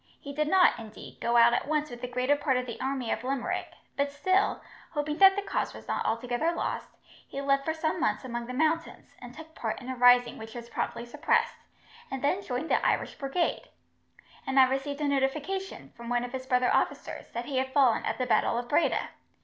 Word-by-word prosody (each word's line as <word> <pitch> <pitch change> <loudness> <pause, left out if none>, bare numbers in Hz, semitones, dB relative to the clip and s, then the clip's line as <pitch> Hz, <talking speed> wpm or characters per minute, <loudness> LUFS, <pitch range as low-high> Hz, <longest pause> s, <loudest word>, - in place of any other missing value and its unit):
He 280 - -8
did 300 +1 0
not, 370 +2 +5
indeed, 220 -1 -11
go 235 0 +2
out 235 0 +7
at 245 - 0
once 300 -2 0
with 240 0 -9
the 250 - -3
greater 250 +3 +1
part 270 -2 +1
of 250 - -2
the 235 - -7
army 265 -3 -2
of - - -2
Limerick, 265 0 -2 0.2
but 280 0 0
still, 375 +7 +1 0.3
hoping 300 0 -2
that 385 0 +8
the 405 - -2
cause - - -2
was - - -12
not - - -1
altogether 245 +7 0
lost, - - -3 0.4
he 275 - -6
lived 275 0 +2
for 320 - -1
some 315 0 -1
months - - 0
among 240 -1 -4
the 250 - -5
mountains, 315 +3 -1
and 245 - -9
took 320 0 -11
part 225 -8 -3
in 255 - -9
a 260 - -3
rising 245 -1 +5
which 220 +1 -9
was 235 -1 -8
promptly 235 - -3
suppressed, 330 - 0 0.4
and 270 -1 -5
then 365 +7 +1
joined 275 -3 -4
the - - +3
Irish - - +1
Brigade; 290 +5 -1 0.8
and 265 0 +3
I 260 - +8
received 280 +2 -2
a 295 - +1
notification, 290 +8 -2
from 235 0 -9
one 245 0 +1
of 245 - -5
his 260 0 -5
brother 250 -1 +2
officers, - - -1
that 235 +1 -4
he 270 0 -3
had 260 0 -2
fallen 260 -5 +3
at 220 - -2
the 255 - -1
battle 235 - +2
of 240 0 -3
Breda. 290 - +1
270 Hz, 220 wpm, -28 LUFS, 245-300 Hz, 0.8 s, that